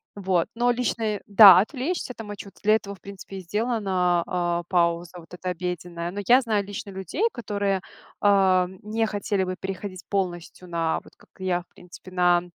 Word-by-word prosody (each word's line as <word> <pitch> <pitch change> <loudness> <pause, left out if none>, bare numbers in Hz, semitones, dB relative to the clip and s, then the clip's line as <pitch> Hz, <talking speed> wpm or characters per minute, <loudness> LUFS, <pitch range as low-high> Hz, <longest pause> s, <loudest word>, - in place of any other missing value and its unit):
Вот. 185 -4 0
Но 240 - -1
лично, 240 -1 -1
э, 210 -2 -1
да, 200 -3 +10
отвлечься 260 - -3
там, 225 -3 -8
э, 205 - -5
чуть, 200 0 -12
для 215 - +4
этого, 200 -2 -3
в - - -22
принципе, 195 0 -10
и - - -5
сделана, 190 -3 0
э, 175 -1 -1
пауза 170 0 +1
вот 165 +1 -16
эта 180 0 -4
обеденная. 175 -1 -4
Но 200 - -5
я 250 +2 +7
знаю 215 -5 0
лично 205 +1 -6
людей, 190 - -4
которые, 200 -4 -1 0.4
а, 190 -2 +4
м, 185 +1 -12
не 225 +2 0
хотели 205 -2 -1
бы 185 0 -3
переходить 190 -1 -6
полностью 180 -2 -3
на 165 -1 0
вот, - - -19
как - - -23
и 190 - -5
я, 180 -1 +1
в 175 - -22
принципе, 180 +1 -13
на 175 -1 +3
190 Hz, 195 wpm, -25 LUFS, 180-205 Hz, 0.4 s, да